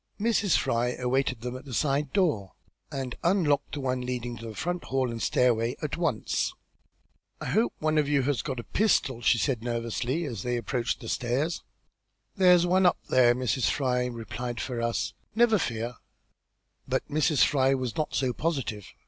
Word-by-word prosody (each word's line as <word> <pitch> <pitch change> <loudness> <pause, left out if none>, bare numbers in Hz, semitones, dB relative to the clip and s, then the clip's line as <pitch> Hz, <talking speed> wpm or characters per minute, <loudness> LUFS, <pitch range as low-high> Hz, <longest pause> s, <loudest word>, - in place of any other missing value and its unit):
Mrs. 215 -3 +2
Fry 120 +1 0
awaited 130 -1 0
them 125 +1 -4
at 130 - -9
the 130 -4 -5
side 145 +2 +1
door, 150 - +1 0.4
and 130 -3 -4
unlocked 165 -6 +2
the - - -4
one 130 -1 -1
leading 125 -1 -3
to 115 - -8
the 110 - -8
front 175 +6 -3
hall 130 -2 0
and 115 -1 -5
stairway 120 -1 +2
at 150 -2 -3
once. 165 -10 -1 0.8
"I - - -6
hope 225 +3 +1
one 155 0 +1
of 145 -1 +1
you 140 -2 +3
has 135 -4 0
got 130 -2 -4
a - - -5
pistol," 140 - +1
she 120 - +4
said, 125 -1 0
nervously, 120 +6 -2
as 115 -9 -5
they 125 +2 -1
approached 120 +2 -2
the 115 - -8
stairs. 130 +9 -1 0.7
"There's 180 -3 +6
no 175 - -1
one 185 0 +4
up - - +3
there, 120 -2 +5
Mrs. 125 0 +1
Fry," 125 -3 0
replied 120 0 -5
Ferrars. 115 -2 -2 0.2
"Never 225 -2 +4
fear." 120 -3 -3 0.9
But - - -1
Mrs. 155 0 +3
Fry 135 -1 +3
was 130 -4 -3
not 155 - -2
so 130 -2 +1
positive. 135 - -2
130 Hz, 175 wpm, -28 LUFS, 120-150 Hz, 0.9 s, There's